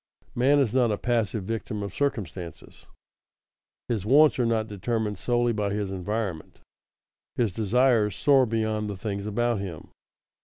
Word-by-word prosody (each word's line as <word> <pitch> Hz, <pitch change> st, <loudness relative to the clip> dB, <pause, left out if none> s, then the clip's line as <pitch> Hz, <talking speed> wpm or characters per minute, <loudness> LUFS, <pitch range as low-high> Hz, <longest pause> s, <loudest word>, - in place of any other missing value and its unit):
Man 135 Hz, +4 st, +3 dB
is 130 Hz, -6 st, +2 dB
not 125 Hz, -3 st, +3 dB
a 105 Hz, -, 0 dB
passive 115 Hz, -4 st, -1 dB
victim 105 Hz, 0 st, -4 dB
of 100 Hz, -2 st, -6 dB
circumstances; 95 Hz, -, -4 dB, 1.0 s
his 110 Hz, -6 st, -1 dB
wants 145 Hz, +6 st, +5 dB
are 120 Hz, -, +2 dB
not 110 Hz, -1 st, 0 dB
determined 105 Hz, 0 st, -2 dB
solely 120 Hz, -1 st, +1 dB
by 105 Hz, -2 st, -1 dB
his 100 Hz, -1 st, -2 dB
environment; 95 Hz, -2 st, -4 dB, 0.8 s
his 115 Hz, -5 st, +1 dB
desires 110 Hz, +1 st, +2 dB
soar 135 Hz, -3 st, +4 dB
beyond 110 Hz, -1 st, -1 dB
the 100 Hz, -, -5 dB
things 100 Hz, 0 st, -4 dB
about 120 Hz, +1 st, 0 dB
him. 90 Hz, -6 st, -7 dB
110 Hz, 145 wpm, -26 LUFS, 100-120 Hz, 1.0 s, wants